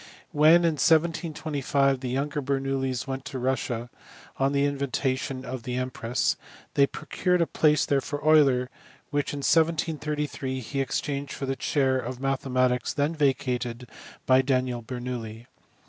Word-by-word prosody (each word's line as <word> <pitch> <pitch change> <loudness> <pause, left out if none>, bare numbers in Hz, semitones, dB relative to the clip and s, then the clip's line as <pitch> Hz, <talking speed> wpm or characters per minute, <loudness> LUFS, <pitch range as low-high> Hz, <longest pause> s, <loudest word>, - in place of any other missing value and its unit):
When, 155 +4 +6
in 155 -4 +1
1725, 155 -4 +1
the 130 -1 -4
younger 140 +3 -1
Bernoullis 135 -2 -1
went 135 0 -4
to 130 - -5
Russia, 120 -2 -2 0.5
on 135 +1 +2
the 140 0 +2
invitation 135 -2 -2
of 130 -1 -5
the 125 +2 -4
empress, 125 -1 -1 0.4
they 140 -1 +4
pro 150 - -9
cured 180 +3 +1
a 170 - +3
place 155 -1 +2
there 140 -1 +1
for 145 - -4
Euler, 135 -5 +4 0.4
which 145 -1 0
in 145 - -5
1733 150 -4 0
he 135 +3 -3
exchanged 140 +1 -3
for 135 - -4
the 135 0 -1
chair 130 0 +1
of 125 0 -5
mathematics 130 -2 0
then 145 +3 +1
vacated 125 -4 -1 0.4
by 130 0 +5
Daniel 130 -2 0
Bernoulli. 120 -2 -6
135 Hz, 145 wpm, -26 LUFS, 125-145 Hz, 0.5 s, When